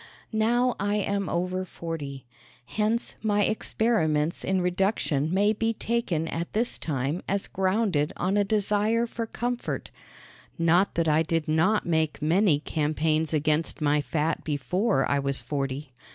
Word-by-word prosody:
Now 240 +3 +2
I 205 +1 0
am 200 -1 -1
over 180 +2 -1
forty. 150 -7 -6 0.4
Hence 215 - -1
my 210 -1 +2
experiments 170 -8 +1
in 190 0 +1
reduction 180 -5 0
may 205 +3 +3
be 225 +1 0
taken 215 -9 -1
at 170 +1 -4
this 235 +3 0
time 145 +2 -2
as 200 0 0
grounded 190 -5 +1
on 185 +3 0
a 205 - +4
desire 210 +2 +1
for 230 -1 -4
comfort 245 +2 -3 0.7
not 170 +4 +3
that 165 -1 +1
I 155 +1 +4
did 165 -1 -1
not 165 +8 +2
make 160 -3 0
many 160 +1 +3
campaigns 155 +1 0
against 155 +1 0
my 150 -1 +2
fat 155 +2 -1
before 180 - 0
I 140 - +1
was 140 0 0
forty. 135 -1 -4
175 Hz, 140 wpm, -26 LUFS, 155-210 Hz, 0.7 s, a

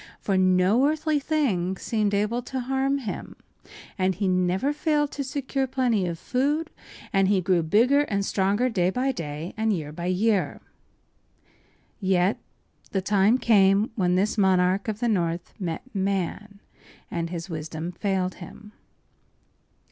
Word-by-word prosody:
For 195 - -1
no 185 +7 +4
earthly 310 0 0
thing 220 - 0
seemed 210 -1 0
able 210 +4 0
to 260 +1 -4
harm 270 +2 0
him; 250 -7 -6 0.6
he 190 +1 +1
never 185 +9 +1
failed 295 -1 0
to 280 - -4
secure 270 -1 -2
plenty 245 -7 +1
of 170 -1 -3
food, 290 - -1 0.4
and 195 -1 +3
he 200 -1 +3
grew 180 -1 +2
bigger 230 - +3
and 200 -6 -1
stronger 200 +6 +1
day 185 -7 +1
by 255 +7 0
day 160 - -6
and 220 0 0
year 155 -7 -3
by 170 +3 -5
year. 195 +2 +1 1.4
Yet 190 0 +1 0.5
the 195 - -1
time 205 +4 +3
came 205 -2 +4
when 180 -3 +1
this 205 +4 +1
monarch 190 0 +2
of 215 +1 -3
the 240 - +1
north 170 -5 -1
met 170 -4 -4
man, 200 +1 -2 0.5
and 170 -1 -2
his 170 +1 -5
wisdom 160 0 -5
failed 185 0 -1
him. 210 +4 -11
200 Hz, 140 wpm, -25 LUFS, 180-245 Hz, 1.4 s, no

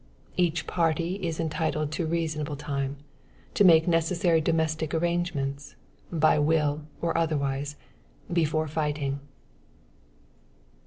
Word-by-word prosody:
Each 175 -2 +1
party 170 +2 0
is 170 -5 -3
entitled 155 -2 -1
to 160 +1 -2
reasonable 155 -2 -2
time, 140 -1 -3 0.6
to - - +4
make 165 -4 +7
the 175 - +1
necessary 165 0 +2
domestic 160 0 0
arrangements, 160 -5 -1 0.4
by 155 -2 +3
will 150 -1 +1
or 170 -1 0
otherwise, 145 -3 0 0.6
before 155 -2 +1
fighting. 145 -2 -1
160 Hz, 105 wpm, -27 LUFS, 150-165 Hz, 0.6 s, make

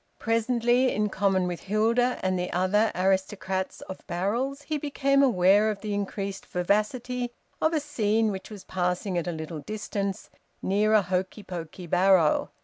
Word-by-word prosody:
Presently, 240 +2 +2
in 210 0 0
common 195 -2 +1
with 175 -1 -4
Hilda 230 +5 +1
and 185 -1 +1
the 180 - -3
other 200 +5 +2
aristocrats 190 0 -1
of 190 - -8
barrels, 235 +11 -2
he 305 -1 -2
became 275 -1 +2
aware 205 -4 +4
of 205 -2 -4
the 210 -1 -3
increased 200 -1 -3
vivacity 235 +7 -1 0.3
of 315 - +3
a 320 - +1
scene 225 -7 +1
which 190 -1 -7
was 210 -3 -9
passing 180 +1 -2
at 175 0 -1
a - - 0
little 160 -1 -6
distance, 200 +3 -4 0.3
near 210 +3 +1
a 210 - +5
hokey 185 +3 -2
pokey 175 -1 -7
barrow. 180 -2 +3
200 Hz, 155 wpm, -27 LUFS, 185-230 Hz, 0.3 s, a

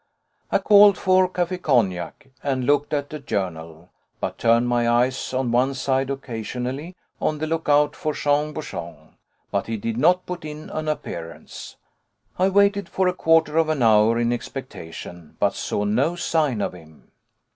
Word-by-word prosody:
I - - +4
called 205 -1 +6
for 185 0 +3
café 180 0 -2
cognac 100 - 0
and 135 -3 -1
looked 145 +2 +2
at 145 0 -2
a 150 - -5
journal, 85 - -5 0.3
but - - -4
turned 115 +1 +3
my 120 -1 +1
eyes 125 +2 +1
on 130 -2 -1
one 130 +3 +2
side 130 0 0
occasionally, 130 +5 -5 0.3
on 155 - 0
the 155 - -2
look 160 0 -2
out 145 0 +3
for 155 -3 -2
Jean 150 +1 0
Bouchon. 85 - -8 0.4
But - - -1
he 115 0 -2
did 115 +2 -3
not 180 +7 +3
put 180 -2 -6
in 150 0 -8
an 155 0 -4
appearance. 85 - -6 0.6
I 190 +1 +4
waited 200 +1 +2
for 190 -1 +1
a 180 - +2
quarter 160 -2 +3
of 160 -1 +2
an 150 -5 0
hour 110 +1 +5
in 120 0 +1
expectation, 90 - -8
but - - +2
saw 105 - -2
no 125 +11 +1
sign 155 -9 0
of - - -2
him. 80 -3 -16
135 Hz, 165 wpm, -23 LUFS, 115-160 Hz, 0.6 s, called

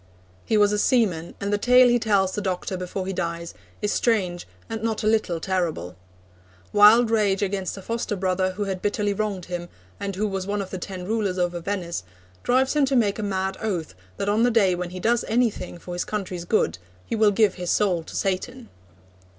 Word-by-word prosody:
He 220 - +2
was 205 -1 +5
a 210 - +1
seaman, 195 -10 +1
and 200 +1 -2
the 205 - +1
tale 250 +2 +6
he 240 0 +3
tells 200 -4 +2
the 210 - -3
doctor 185 -1 -2
before 185 +1 -4
he 195 - -3
dies 170 -1 -3 0.3
is 210 - +1
strange 185 -7 0 0.2
and 225 -1 -5
not 225 -1 -1
a - - +1
little 215 -6 +1
terrible. 165 - -2 0.8
Wild 220 +3 +7
rage 205 -3 +2
against 195 -1 -2
a 195 - -9
foster 230 -1 -2
brother 185 0 0
who 205 +2 -3
had 190 -2 -3
bitterly 205 0 0
wronged 200 -3 -2
him, 175 -1 -5 0.3
and 200 -1 -3
who 210 +3 0
was 195 -1 -3
one 205 +1 -1
of 195 -2 -5
the 185 - -4
ten 185 0 -6
rulers 205 -3 -1
over 175 -1 0
Venice, 175 - -3 0.4
drives 260 +3 +2
him 295 -2 +4
to 270 0 0
make 215 -4 +2
a - - -1
mad 190 -1 -2
oath 180 - -2 0.2
that - - -2
on 210 +2 +2
the 245 - +5
day 210 -6 +3
when 175 0 -3
he 185 +1 -7
does 235 +4 +2
anything 225 -6 0
for 175 +1 -8
his 175 - -1
country's 185 -4 -4
good 90 - +1 0.3
he - - -2
will 215 -1 +5
give 205 -1 +3
his 180 -2 -5
soul 185 -5 +2
to - - -10
Satan. 225 +6 -2
200 Hz, 210 wpm, -24 LUFS, 180-215 Hz, 0.8 s, Wild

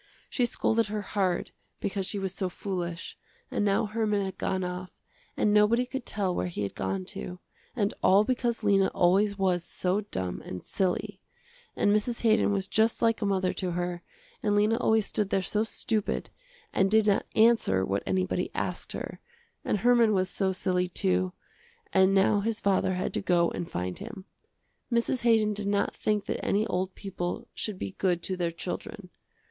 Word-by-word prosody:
She 245 -2 +2
scolded 230 -1 +1
her 210 0 -3
hard 190 -3 -1 0.3
because 195 -1 -2
she 205 - 0
was 190 -2 -2
so 190 -1 -2
foolish, 175 -2 -5 0.3
and - - 0
now 200 +1 +2
Herman 210 -2 0
had 190 -1 -6
gone 185 -1 -1
off 180 0 -4 0.5
and 210 - +3
nobody 215 +4 +4
could 260 0 -6
tell 195 -3 0
where - - -1
he 170 -12 -4
had 100 - -3
gone 95 -1 -3
to, 180 - -6 0.4
and 205 -4 0
all 195 +2 +6
because 240 -1 -1
Lena 195 -2 +4
always 200 +3 +3
was 185 -3 +1
so 185 +3 -1
dumb 90 -1 -3
and 90 - -7
silly. 190 +1 -1 0.6
And 205 - +3
Mrs. 230 +3 -1
Haydon 220 -2 +3
was 195 -1 0
just 220 +2 +2
like 230 0 +3
a 205 - +1
mother 190 -2 +1
to 180 -2 -2
her, 175 0 -2 0.4
and 205 -1 +1
Lena 210 +2 +3
always 220 -3 +3
stood 210 -2 -1
there 195 -1 +1
so 210 +3 0
stupid 220 -1 -2 0.4
and 195 0 +3
did 220 +1 +4
not 205 -2 +2
answer 220 - +4
what 100 +1 -1
anybody 185 -1 0
asked - - -3
her, - - -6 0.4
and - - 0
Herman 235 -2 +5
was 185 -1 0
so 190 -2 +1
silly 180 -1 0
too, 90 - +1 0.6
and 190 +1 +5
now 195 +2 +4
his 220 +2 -1
father 190 -1 +2
had 180 - -2
to - - 0
go 175 -3 +2
and 170 - -5
find 90 +1 -3
him. 210 -3 -8 0.7
Mrs. 235 +2 +1
Haydon 220 -3 +3
did 205 -1 -2
not 200 0 +1
think 210 -2 -1
that - - -3
any 210 +2 +2
old 185 -2 -2
people 195 +4 -4
should 210 -3 -4
be 190 - -4
good 175 -3 +1
to 185 - -2
their 175 -2 0
children. 180 +3 -6
195 Hz, 185 wpm, -28 LUFS, 180-215 Hz, 0.7 s, all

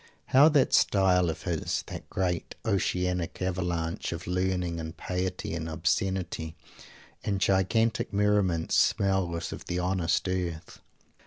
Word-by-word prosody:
How 140 +4 +8
that 145 -4 +3
"style" 90 -3 +4
of 80 - -5
his, - - -2
that - - -8
great 90 -2 -2
oceanic 90 -4 0
avalanche 90 -3 -2
of 85 0 -5
learning 90 -1 -1
and 80 +1 -6
piety 90 -2 -3
and 80 -1 -4
obscenity 80 0 -1 0.7
and 100 -2 -1
gigantic 100 +4 +1
merriment, 100 -5 +1
smells 90 -4 +1
of - - -9
the 90 - -3
honest 90 -1 0
earth! 90 -3 -3
90 Hz, 125 wpm, -28 LUFS, 85-95 Hz, 0.7 s, How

